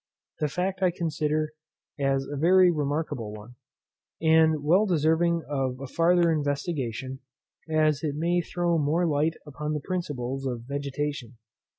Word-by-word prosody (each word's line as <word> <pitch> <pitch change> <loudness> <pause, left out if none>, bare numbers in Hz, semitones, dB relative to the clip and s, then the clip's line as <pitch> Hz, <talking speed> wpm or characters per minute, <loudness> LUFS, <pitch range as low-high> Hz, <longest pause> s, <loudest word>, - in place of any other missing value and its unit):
This 150 -2 -2
fact 185 +1 -1
I 185 - +4
consider 155 -2 -1 0.5
as 135 -1 +1
a 145 - -6
very 180 +4 +5
remarkable 145 -7 -2
one, 105 +3 -11 0.7
and 160 -2 +4
well 185 +8 +4
deserving 165 0 +2
of 135 -3 -2
a 135 - -5
farther 170 +4 +3
investigation, 140 -4 -2 0.5
as 155 -1 +2
it 145 -2 -1
may 170 +3 +1
throw 175 -1 0
more 155 +4 +1
light 155 +1 +1
upon 150 +1 -4
the 150 - -1
principles 135 -6 -3
of 120 -2 -3
vegetation. 140 -1 -4
150 Hz, 135 wpm, -27 LUFS, 140-170 Hz, 0.7 s, very